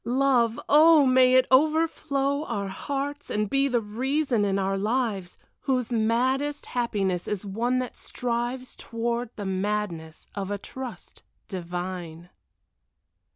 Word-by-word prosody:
Love! 245 Hz, -2 st, +2 dB
oh, 310 Hz, 0 st, +7 dB
may 255 Hz, 0 st, +5 dB
it 255 Hz, 0 st, +6 dB
overflow 290 Hz, -1 st, +2 dB
Our 200 Hz, -7 st, -3 dB
hearts 285 Hz, +7 st, -4 dB
and 210 Hz, 0 st, 0 dB
be 275 Hz, +5 st, +2 dB
the 245 Hz, -3 st, +1 dB
reason 250 Hz, +2 st, 0 dB
in 195 Hz, -1 st, +1 dB
our 195 Hz, 0 st, 0 dB
lives, 210 Hz, -3 st, -1 dB, 0.2 s
Whose 255 Hz, -3 st, -1 dB
maddest 255 Hz, +6 st, +1 dB
happiness 200 Hz, -7 st, -1 dB
is 210 Hz, -1 st, -3 dB
one 235 Hz, +6 st, 0 dB
that 255 Hz, -1 st, -3 dB
strives 245 Hz, +1 st, -3 dB
Toward 235 Hz, +1 st, -3 dB
the 205 Hz, -, -5 dB
madness 190 Hz, -4 st, -3 dB
of 195 Hz, -1 st, -4 dB
a 205 Hz, -, -2 dB
trust 260 Hz, +4 st, -8 dB, 0.3 s
divine. 175 Hz, -2 st, -6 dB
235 Hz, 125 wpm, -26 LUFS, 200-265 Hz, 0.3 s, oh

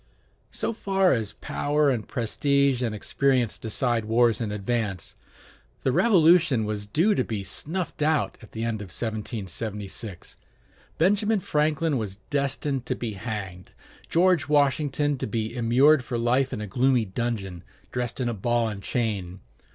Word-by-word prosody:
So -, -, -2 dB
far 195 Hz, -3 st, +2 dB
as 110 Hz, -4 st, -2 dB
power 145 Hz, 0 st, 0 dB
and 115 Hz, -5 st, -3 dB
prestige 140 Hz, +2 st, +1 dB
and 115 Hz, -3 st, -1 dB
experience 125 Hz, +2 st, 0 dB
decide 115 Hz, 0 st, 0 dB
wars 115 Hz, +1 st, +3 dB
in 110 Hz, -3 st, -2 dB
advance, 105 Hz, -2 st, -2 dB, 0.7 s
the 130 Hz, -, +2 dB
Revolution 165 Hz, -, +4 dB
was 105 Hz, -1 st, -3 dB
due 170 Hz, -, +3 dB
to -, -, +1 dB
be 105 Hz, -3 st, -4 dB
snuffed 165 Hz, -, -4 dB
out 155 Hz, 0 st, +1 dB
at 110 Hz, -, -15 dB
the 115 Hz, -, -3 dB
end 115 Hz, -2 st, -2 dB
of 100 Hz, -, -7 dB
1776; 105 Hz, -1 st, -5 dB, 0.6 s
Benjamin 205 Hz, +5 st, +3 dB
Franklin 150 Hz, -3 st, +1 dB
was 100 Hz, -3 st, -4 dB, 0.2 s
destined 140 Hz, -2 st, -1 dB
to -, -, 0 dB
be 115 Hz, -3 st, -4 dB
hanged, 95 Hz, -4 st, -6 dB, 0.4 s
George 175 Hz, -3 st, +3 dB
Washington 145 Hz, -1 st, +2 dB
to -, -, -2 dB
be 110 Hz, +2 st, -3 dB
immured 125 Hz, +5 st, +4 dB
for 125 Hz, -1 st, -3 dB
life 125 Hz, +3 st, +2 dB
in 105 Hz, -, -4 dB
a -, -, -3 dB
gloomy 125 Hz, +2 st, +2 dB
dungeon, 95 Hz, -4 st, -3 dB, 0.3 s
dressed 125 Hz, -1 st, -3 dB
in 125 Hz, -, 0 dB
a 120 Hz, -, -1 dB
ball 115 Hz, +2 st, 0 dB
and 100 Hz, -2 st, -6 dB
chain. 100 Hz, -6 st, -2 dB
120 Hz, 150 wpm, -26 LUFS, 110-145 Hz, 0.7 s, Revolution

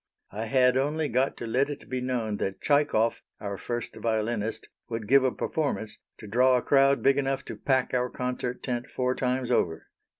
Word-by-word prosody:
I 110 Hz, +3 st, -4 dB
had 125 Hz, +2 st, +3 dB
only 150 Hz, +3 st, 0 dB
got 130 Hz, +3 st, +1 dB
to -, -, -5 dB
let 130 Hz, +5 st, +1 dB
it 145 Hz, -, -7 dB
be 130 Hz, -1 st, -3 dB
known 120 Hz, -5 st, -1 dB
that 95 Hz, -1 st, -3 dB
Tchaikov 145 Hz, -6 st, +2 dB, 0.2 s
our 100 Hz, -2 st, -4 dB
first 120 Hz, +4 st, -5 dB
violinist 110 Hz, -1 st, -2 dB, 0.2 s
would 115 Hz, -2 st, -4 dB
give 135 Hz, +3 st, +6 dB
a 130 Hz, -, +2 dB
performance 140 Hz, -9 st, -2 dB, 0.2 s
to -, -, -11 dB
draw 125 Hz, +4 st, +4 dB
a 125 Hz, -, -2 dB
crowd 140 Hz, 0 st, +4 dB
big 135 Hz, +1 st, +4 dB
enough 135 Hz, -1 st, -1 dB
to -, -, -6 dB
pack 130 Hz, -2 st, 0 dB
our 125 Hz, 0 st, +1 dB
concert 125 Hz, 0 st, -4 dB
tent 125 Hz, 0 st, -2 dB
four 125 Hz, 0 st, 0 dB
times 125 Hz, -1 st, -1 dB
over. 80 Hz, -8 st, 0 dB
125 Hz, 190 wpm, -27 LUFS, 115-135 Hz, 0.2 s, give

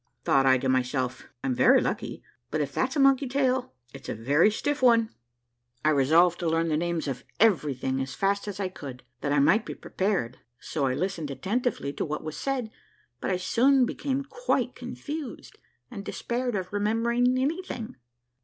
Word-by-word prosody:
Thought 135 Hz, -1 st, +3 dB
I 130 Hz, 0 st, +6 dB
to 130 Hz, -, -2 dB
myself, 130 Hz, 0 st, -1 dB, 0.2 s
I'm 135 Hz, -, 0 dB
very -, -, +5 dB
lucky, -, -, -3 dB, 0.3 s
but 155 Hz, -, -1 dB
if 140 Hz, -2 st, -2 dB
that's 260 Hz, -, 0 dB
a -, -, +1 dB
monkey's 275 Hz, -1 st, +4 dB
tail 260 Hz, -, +1 dB, 0.2 s
it's 135 Hz, -2 st, -10 dB
a -, -, -2 dB
very 140 Hz, -, +3 dB
stiff 290 Hz, +7 st, -2 dB
one! 230 Hz, -3 st, +4 dB, 0.7 s
I 155 Hz, -, +5 dB
resolved 160 Hz, +5 st, +4 dB
to 170 Hz, -3 st, 0 dB
learn 165 Hz, +1 st, +1 dB
the 155 Hz, -, +1 dB
names 170 Hz, 0 st, -1 dB
of 130 Hz, -2 st, -4 dB, 0.2 s
every 175 Hz, -11 st, +3 dB
thing 130 Hz, +1 st, -2 dB
as 130 Hz, -1 st, -5 dB
fast 200 Hz, +4 st, 0 dB
as 205 Hz, -1 st, -5 dB
I 195 Hz, -, 0 dB
could, 140 Hz, -9 st, -9 dB, 0.2 s
that 145 Hz, -, -2 dB
I 145 Hz, -, +3 dB
might 170 Hz, +10 st, +4 dB
be -, -, -7 dB
prepared, 185 Hz, -, -2 dB, 0.2 s
so 140 Hz, -4 st, -2 dB
I 130 Hz, -, 0 dB
listened 175 Hz, -4 st, -2 dB
attentively 185 Hz, -, -2 dB
to -, -, -3 dB
what 150 Hz, -1 st, -4 dB
was 155 Hz, -1 st, -5 dB
said; 260 Hz, -5 st, -2 dB, 0.5 s
but -, -, -3 dB
I 185 Hz, -, +1 dB
soon 250 Hz, +8 st, +3 dB
became 275 Hz, +2 st, -2 dB
quite 485 Hz, -, -1 dB
confused, 300 Hz, -3 st, -7 dB, 0.3 s
and 200 Hz, -5 st, -6 dB
despaired 245 Hz, +2 st, -2 dB
of 185 Hz, 0 st, -4 dB
remembering 235 Hz, +4 st, +2 dB
anything. 275 Hz, -4 st, -3 dB
185 Hz, 180 wpm, -27 LUFS, -, 0.7 s, I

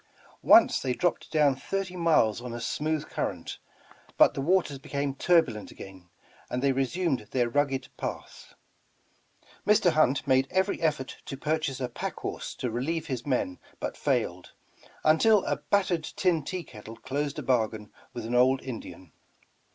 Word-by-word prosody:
Once -, -, +6 dB
they 130 Hz, -, -1 dB
dropped 175 Hz, +7 st, -1 dB
down 150 Hz, -3 st, +3 dB
thirty 190 Hz, +6 st, -4 dB
miles 155 Hz, -, +2 dB
on 125 Hz, -1 st, -6 dB
a -, -, -5 dB
smooth 150 Hz, +6 st, -2 dB
current, -, -, -4 dB, 0.6 s
but -, -, +6 dB
the -, -, -3 dB
waters 160 Hz, -3 st, +1 dB
became 140 Hz, 0 st, -3 dB
tur 170 Hz, +4 st, +4 dB
bulent 110 Hz, -5 st, -8 dB
again, 95 Hz, -2 st, -12 dB, 0.4 s
and 125 Hz, +1 st, -2 dB
they 140 Hz, -, +4 dB
resumed 135 Hz, -, -1 dB
their 125 Hz, -2 st, +1 dB
rugged 135 Hz, +1 st, 0 dB
path. -, -, -7 dB, 1.1 s
Mr. 210 Hz, -4 st, +4 dB
Hunt 150 Hz, -4 st, +2 dB
made 130 Hz, 0 st, +3 dB
eYery 190 Hz, +2 st, 0 dB
effort 150 Hz, -5 st, -1 dB
to 135 Hz, -, -5 dB
purchase 150 Hz, -2 st, -1 dB
a 125 Hz, -, -1 dB
pack 120 Hz, -, -5 dB
horse -, -, -5 dB
to 125 Hz, -, -3 dB
relieve 155 Hz, +8 st, -2 dB
his 130 Hz, -4 st, -5 dB
men 125 Hz, -9 st, -1 dB, 0.2 s
but -, -, -4 dB
failed, -, -, -1 dB, 0.5 s
until 195 Hz, +7 st, +5 dB
a -, -, 0 dB
battered 185 Hz, -5 st, 0 dB
tin 170 Hz, -2 st, 0 dB
tea 180 Hz, +4 st, -4 dB
kettle 110 Hz, -3 st, -11 dB
closed 140 Hz, +4 st, -3 dB
a -, -, -4 dB
bargain 110 Hz, -4 st, 0 dB, 0.2 s
with 120 Hz, -2 st, -6 dB
an 115 Hz, -, -4 dB
old 130 Hz, +2 st, +4 dB
Indian. 110 Hz, -, -8 dB
135 Hz, 160 wpm, -28 LUFS, 125-165 Hz, 1.1 s, Once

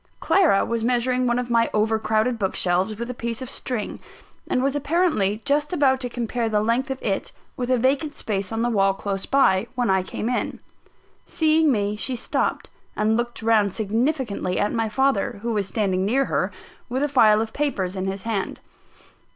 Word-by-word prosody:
Clara 345 Hz, -, +3 dB
was 230 Hz, -1 st, -2 dB
measuring 250 Hz, +1 st, +1 dB
one 240 Hz, 0 st, +1 dB
of 245 Hz, -1 st, -3 dB
my 230 Hz, 0 st, +3 dB
over 220 Hz, +1 st, +2 dB
crowded 220 Hz, +2 st, 0 dB
book 190 Hz, -2 st, -1 dB
shelves, 185 Hz, +4 st, +1 dB
with 235 Hz, +1 st, -4 dB
a -, -, -6 dB
piece 235 Hz, -1 st, -4 dB
of 260 Hz, -2 st, -4 dB
string; 240 Hz, -5 st, -3 dB, 0.5 s
and 255 Hz, -, 0 dB
was 275 Hz, +1 st, 0 dB
apparently 290 Hz, -, +1 dB
just 295 Hz, +3 st, +1 dB
about 270 Hz, -5 st, +3 dB
to 250 Hz, -2 st, -3 dB
compare 235 Hz, -1 st, -2 dB
the 210 Hz, -1 st, +2 dB
length 240 Hz, +5 st, 0 dB
of 265 Hz, 0 st, -3 dB
it 195 Hz, -3 st, -1 dB, 0.2 s
with 245 Hz, -1 st, -3 dB
a 255 Hz, -, +3 dB
vacant 275 Hz, +5 st, +1 dB
space 200 Hz, -2 st, -3 dB
on 225 Hz, +1 st, -1 dB
the 240 Hz, -, +1 dB
wall 195 Hz, -3 st, +2 dB
close 195 Hz, -1 st, -4 dB
by, 230 Hz, -7 st, +3 dB
when 245 Hz, -4 st, +1 dB
I 190 Hz, 0 st, +3 dB
came 200 Hz, +4 st, -5 dB
in. 245 Hz, 0 st, -2 dB, 0.7 s
Seeing 315 Hz, -1 st, +3 dB
me, 205 Hz, -3 st, 0 dB
she 250 Hz, +4 st, -2 dB
stopped; -, -, -2 dB, 0.2 s
and 215 Hz, +1 st, +2 dB
looked 240 Hz, -1 st, -3 dB
round 215 Hz, -4 st, +3 dB
significantly 225 Hz, -3 st, -1 dB
at 205 Hz, -, 0 dB
my 225 Hz, -2 st, 0 dB
father, 240 Hz, -3 st, +1 dB
who 235 Hz, 0 st, -1 dB
was 205 Hz, -3 st, -1 dB
standing 195 Hz, -3 st, 0 dB
near 260 Hz, +7 st, +2 dB
her, -, -, -1 dB, 0.4 s
with 260 Hz, +3 st, -1 dB
a -, -, +2 dB
file 220 Hz, -7 st, +5 dB
of 220 Hz, 0 st, -3 dB
papers 200 Hz, -11 st, -1 dB
in 190 Hz, 0 st, -3 dB
his 190 Hz, 0 st, -4 dB
hand. 220 Hz, -4 st, -3 dB
230 Hz, 195 wpm, -23 LUFS, 210-260 Hz, 0.7 s, file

